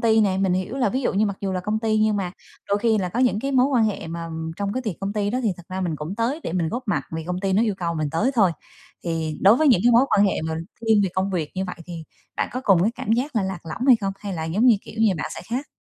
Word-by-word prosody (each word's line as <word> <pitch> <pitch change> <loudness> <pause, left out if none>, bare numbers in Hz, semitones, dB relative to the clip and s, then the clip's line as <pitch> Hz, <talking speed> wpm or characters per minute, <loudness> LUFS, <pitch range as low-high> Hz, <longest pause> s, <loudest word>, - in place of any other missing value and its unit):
ty 225 -1 +4
nè? 195 -3 +2
Mình 190 -2 +2
hiểu 185 +7 -2
là 250 -5 +2
ví 255 +6 -1
dụ - - +1
như 210 +3 +2
mặc 200 -1 -3
dù 195 -1 -2
là 185 - -1
công 210 +4 -1
ty, 215 -1 +1
nhưng 215 -1 +2
mà 180 -3 -2 0.4
đôi 200 +1 +2
khi 220 -1 +2
là 180 -2 -1
có 230 +8 -2
những 240 -5 +2
cái 275 +1 -2
mối 255 0 +4
quan 250 -5 +2
hệ 210 -6 -2
mà 165 0 -5 0.3
trong 200 0 -2
cái 255 - -2
tiệc 215 -7 -3
công 195 +1 -2
ty 205 -1 -1
đó 250 - -1
thì 210 -4 +1
thật 175 - -12
ra 185 +1 -4
mình 170 -4 -1
cũng 155 +6 -5
tới 250 +8 -1
để - - -4
mình 170 -3 0
góp 245 +7 -3
mặt - - +1
vì 160 -1 -4
công 180 +1 -3
ty 195 -1 0
nó 210 +4 +3
yêu 215 -4 +1
cầu 170 -2 -2
mình 155 -2 -2
tới 215 +11 +1
thôi, 200 -6 +4 0.5
thì 160 -2 -2
đối 200 +5 +6
với 310 0 +3
những 200 -8 +5
cái 245 - +6
mối 235 +3 +6
quan 205 0 +5
hệ 190 - -1
mà 160 0 -2 0.3
thiên 220 -2 +3
về 195 - +1
công 190 +1 0
việc 165 -5 -2
như 190 +1 -1
vậy 180 - -6
thì 165 -2 -7 0.3
bạn - - 0
có 255 - -3
cùng 185 -4 +5
cái 215 - +3
cảm 220 - -2
giác 255 +2 -1
là 205 - +3
lạc 190 -1 -3
lõng 235 - -4
hay 250 -3 +8
không, 195 -1 -1
hay 200 -1 -5
là 160 - -3
giống 195 +10 +1
như, 235 - +7
kiểu - - -11
như, 220 -3 +4
bạn 155 - -4
sẽ - - -7
khác? 260 +5 -2
200 Hz, 325 wpm, -23 LUFS, 180-230 Hz, 0.5 s, hay